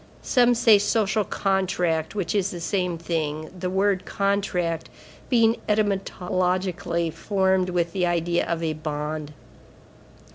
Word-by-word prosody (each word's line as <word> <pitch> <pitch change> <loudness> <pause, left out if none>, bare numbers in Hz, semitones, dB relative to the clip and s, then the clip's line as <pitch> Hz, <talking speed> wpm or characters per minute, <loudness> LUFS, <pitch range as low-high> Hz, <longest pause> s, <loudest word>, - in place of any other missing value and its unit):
Some 245 -2 +4
say 225 -3 +6
social 215 0 +1
contract; 180 -5 0
which 180 -5 -2
is 200 -2 +1
the 175 - -6
same 180 0 -1
thing, 155 -2 -3
the 180 0 -3
word 190 0 +1
contract 195 -5 -1 0.4
being 230 -2 +4
etymologically 185 -4 0
formed 190 +2 +1
with 170 -2 -1
the 180 -2 +1
idea 175 0 0
of 170 -1 -2
a 160 -1 0
bond. 150 0 -4
180 Hz, 120 wpm, -24 LUFS, 165-200 Hz, 0.4 s, say